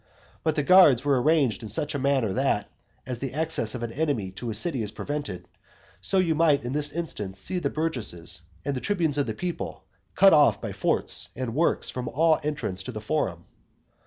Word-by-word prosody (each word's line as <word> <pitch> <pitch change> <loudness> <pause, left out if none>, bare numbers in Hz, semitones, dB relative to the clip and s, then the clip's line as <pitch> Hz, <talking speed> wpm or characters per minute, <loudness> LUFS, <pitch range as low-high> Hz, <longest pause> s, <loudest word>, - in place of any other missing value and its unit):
But 160 -1 +1
the 150 - +1
guards 145 -7 +6
were 140 -3 +3
arranged 145 -7 +2
in 110 - -7
such 150 +8 -2
a 145 - -2
manner, 130 -7 +1
that, - - 0 0.4
as 125 -2 -4
the 135 0 -5
access 155 -8 -1
of 120 - -5
an 115 - -4
enemy 140 -11 -1
to 115 +5 -6
a 110 - -2
city 135 +2 +1
is 105 - -1
prevented, 145 -4 -5 0.5
so 195 - +2
you 180 -3 +3
might 155 -4 +3
in 120 +2 -4
this 145 0 +1
instance 105 - -5
see 180 - -2
the - - -1
burgesses 110 - -2 0.2
and 140 - -1
the 125 - -4
tribunes 165 -8 0
of 140 - 0
the 110 - -3
people 180 +4 -5 0.3
cut 195 -1 +7
off 140 -9 +5
by 110 -1 -5
forts 95 - +1
and 125 -2 -4
works 165 +6 +1
from 125 -1 -5
all 160 +5 +3
entrance 145 -11 -2
to 95 - -6
the 110 - -6
forum. 105 - -2
140 Hz, 205 wpm, -26 LUFS, 110-155 Hz, 0.5 s, cut